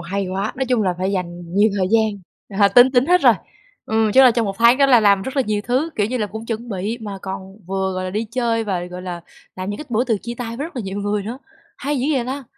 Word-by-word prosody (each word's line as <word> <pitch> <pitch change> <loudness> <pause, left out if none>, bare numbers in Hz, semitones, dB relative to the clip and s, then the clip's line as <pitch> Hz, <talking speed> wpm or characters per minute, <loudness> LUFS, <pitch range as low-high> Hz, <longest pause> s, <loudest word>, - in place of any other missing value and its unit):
Hay 195 +3 -3
quá, 195 +3 -2
nói 265 - -1
chung 245 -4 +2
là 185 -3 0
phải 190 +2 -1
dành 175 -2 -5
nhiều 210 +2 +4
thời 185 - +1
gian, 220 -2 +2 0.4
à, 200 - +7
tính 245 +4 +6
tính 255 0 +3
hết 360 +2 +4
rồi, - - +6 0.5
ừm, 220 -1 +1
chứ 265 - +7
là 255 - +8
trong 230 -1 0
1 195 -1 -4
tháng 235 +2 +6
đó 280 - +5
là 250 -4 +6
làm 200 -2 +4
rất 265 +6 -6
là 270 - +3
nhiều 210 -1 0
thứ, 260 +7 0
kiểu 205 - +1
như 250 +4 -2
là, 210 - -1
cũng 220 +2 -8
chuẩn 230 +1 -4
bị 205 +3 -3
mà 205 -3 -6
còn 190 0 -7
vừa, 190 0 -1
gọi 185 0 -3
là, 185 - -3
đi 215 +4 -2
chơi 230 -2 0
và, 185 -4 -2
gọi 180 0 -8
là, 175 -2 -5 0.4
làm 185 +1 -4
những 205 - -5
cái - - -6
bữa 240 0 +1
từ 230 -4 +1
chia 235 +1 -5
tay 230 -1 -5
với 285 +5 -3
rất 330 - -14
là 245 - -2
nhiều 195 0 -5
người 205 0 -1
nữa, 230 +6 -6 0.4
hay 290 0 -2
dữ 255 - -1
vậy 255 -3 0
ta! 270 +1 -4
215 Hz, 290 wpm, -20 LUFS, 195-245 Hz, 0.5 s, là